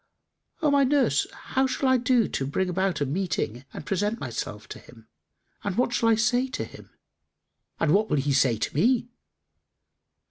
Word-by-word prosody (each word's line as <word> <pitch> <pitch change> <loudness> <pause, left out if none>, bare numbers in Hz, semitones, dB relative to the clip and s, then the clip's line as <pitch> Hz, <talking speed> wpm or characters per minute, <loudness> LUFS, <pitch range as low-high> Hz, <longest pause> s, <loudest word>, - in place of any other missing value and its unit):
O 300 - +4
my 280 -1 +4
nurse, 275 +1 +2
how 265 0 -1
shall 265 +1 -1
I 260 0 +5
do 245 -2 +2
to 135 - -3
bring 185 +6 -1
about 180 -3 -1
a - - +2
meeting 140 - -2
and - - -8
present 205 +7 -1
myself 110 -4 -5
to - - -8
him, 115 -2 -17 0.6
and 200 -2 -3
what 245 0 +1
shall 230 -1 +2
I 225 - +5
say 245 +4 +1
to 255 - -4
him - - -12 0.9
and 155 - +2
what 215 +2 +2
will - - +1
he 140 +1 0
say 130 -4 +3
to - - -3
me?" 235 - +2
195 Hz, 180 wpm, -26 LUFS, -, 0.9 s, I